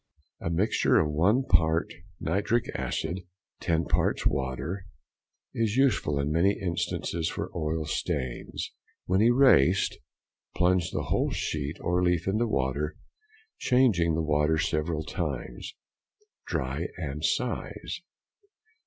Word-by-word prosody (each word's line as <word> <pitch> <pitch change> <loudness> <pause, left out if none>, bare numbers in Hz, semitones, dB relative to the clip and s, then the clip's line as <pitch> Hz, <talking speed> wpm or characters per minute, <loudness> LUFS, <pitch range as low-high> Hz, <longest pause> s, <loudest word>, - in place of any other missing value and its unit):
A - - -3
mixture 90 +6 +2
of 75 -1 +1
1 100 - +3
part 80 -4 +2 0.3
nitric 100 +8 0
acid, 85 +4 -2 0.4
10 85 0 0
parts - - +1
water, 70 +9 -2 0.7
is 115 -2 0
useful 110 - +2
in 70 +2 0
many 90 +6 +2
instances 85 -2 -2
for - - -4
oil 80 -1 -1
stains. 65 -4 -3 0.3
When 95 +2 +2
erased, 120 - +5 0.6
plunge 90 -1 +2
the - - -2
whole - - +1
sheet 75 0 -3
or 90 +1 +1
leaf 90 -1 +1
into 110 +5 +1
water, 70 - -1 0.6
changing 105 -11 +3
the 80 - 0
water 75 +1 +2
several 80 0 0
times. - - -4 0.7
Dry - - -2
and - - -4
size. - - -2
85 Hz, 115 wpm, -28 LUFS, 75-95 Hz, 0.7 s, erased